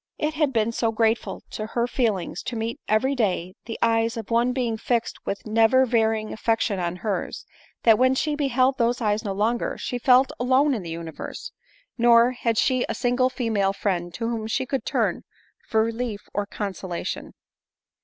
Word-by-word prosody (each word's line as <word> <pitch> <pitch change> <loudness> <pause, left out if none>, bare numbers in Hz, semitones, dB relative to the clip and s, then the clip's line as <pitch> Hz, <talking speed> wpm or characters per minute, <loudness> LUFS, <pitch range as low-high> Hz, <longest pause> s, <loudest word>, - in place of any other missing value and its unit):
It 305 +1 -1
had 300 -3 +1
been 225 -2 +1
so 230 -1 0
grateful 225 +1 0
to 215 - -4
her 235 +1 0
feelings 215 -9 -1
to 245 - -3
meet 225 +1 -3
every 240 +6 +2
day 185 -7 -1
the 230 - -5
eyes 230 0 +2
of 225 0 -7
one 235 +2 +3
being 245 -3 -1
fixed 235 +1 -2
with 200 - -3
never 225 +4 +4
varying 220 -2 +1
affection 220 -2 0
on 175 0 -2
hers, 190 -1 -3 0.4
that, 225 -2 +6
when 255 +1 +4
she 300 +3 0
beheld 265 -2 +1
those 235 +1 +2
eyes 215 -1 0
no 205 - -2
longer, 220 +4 0
she 245 - -4
felt 255 +2 +5
alone 260 +4 +3
in 225 - -2
the 170 - -7
universe 165 -1 -7 0.2
— - - -36
nor 235 +1 +6
had 230 -3 -1
she 255 0 +2
a - - -1
single 255 0 +2
female 220 -7 0
friend 175 -4 -2
to 230 - -2
whom 225 -2 -3
she 255 +3 -1
could 270 +1 -3
turn - - 0 0.5
for 220 0 +2
relief 230 -2 -3
or 205 0 -1
consolation. 190 -4 -5
230 Hz, 185 wpm, -24 LUFS, 215-250 Hz, 0.5 s, that